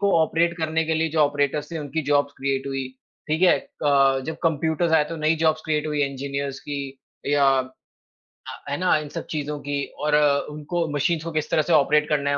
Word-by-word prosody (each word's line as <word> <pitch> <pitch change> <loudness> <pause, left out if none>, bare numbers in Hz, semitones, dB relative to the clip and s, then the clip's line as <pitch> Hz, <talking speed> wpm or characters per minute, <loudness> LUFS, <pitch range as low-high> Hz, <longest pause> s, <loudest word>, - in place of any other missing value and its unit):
को 200 0 +2
ऑपरेट 170 +2 +1
करने 160 0 0
के 160 0 0
लिए 160 +1 +1
जो 160 - -2
ऑपरेटर्स 145 0 +1
थे, 165 - -3
उनकी 155 +1 -3
जॉब्स 145 0 +1
क्रिएट 135 0 -2
हुई। 135 -1 -3 0.4
ठीक 155 +3 0
है? 185 - +6 0.2
क 135 -2 +3
जब 160 0 -4
कंप्यूटर्स 160 +1 +1
आए 155 -2 +5
तो 165 - -5
नई 155 +1 +2
जॉब्स 155 -1 +2
क्रिएट 155 -1 0
हुई 150 -1 0
इंजीनियर्स 140 0 -3
की 145 -1 -5 0.5
या 145 0 +3
अ, 130 0 -4 1.0
है - - 0
ना, 180 0 +3
इन 150 -1 -5
सब - - -6
चीज़ों 150 -1 -3
की। 145 0 -3 0.2
और 150 -1 +3 0.3
उनको 155 +3 -3
मशीन्स 155 +3 0
को 165 - -5
किस 155 -1 -2
तरह 155 - +4
से 170 - 0
ऑपरेट 150 0 +4
करना 140 -2 +1
है, 140 - +1
150 Hz, 210 wpm, -23 LUFS, 140-160 Hz, 1.0 s, है